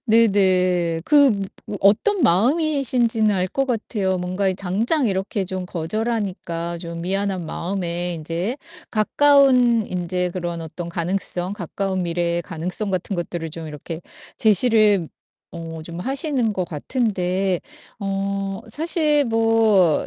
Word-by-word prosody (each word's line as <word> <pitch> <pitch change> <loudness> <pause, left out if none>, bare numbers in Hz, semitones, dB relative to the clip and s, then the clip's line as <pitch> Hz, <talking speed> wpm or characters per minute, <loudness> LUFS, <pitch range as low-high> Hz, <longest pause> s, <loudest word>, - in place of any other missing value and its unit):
네네. 185 -6 +3
그 285 -3 +6 0.4
무 205 - -4
어떤 325 - +3
마음이신지는 240 - +2
알 185 0 +1
것 270 +5 -1
같아요. 210 -5 -1
뭔가 185 +2 -1
이 185 - 0
당장 225 - 0
이렇게 195 0 -1
좀 185 0 -4
거절하니까 180 -2 -3
좀 170 -1 -6
미안한 190 -1 -1
마음에 175 0 -3
인제 170 - -3 0.3
가까운 250 -1 +4
인제 180 0 -2
그런 175 -2 -4
어떤 170 +2 -7
가능성, 180 +2 -2
가까운 190 0 -3
미래의 170 0 0
가능성 180 +4 -4
같은 185 +1 -2
것들을 170 -1 -4
좀 160 +1 -7
이렇게 155 +2 -7 0.4
제시를 215 -4 +4 0.4
어 165 -1 -7
좀 170 +2 -7
하시는 265 - 0
것 185 - -1
같은데 185 - -1 0.4
어 195 0 -2
사실 300 - +2
뭐 225 -7 +3
190 Hz, 255 characters per minute, -22 LUFS, 175-225 Hz, 0.4 s, 그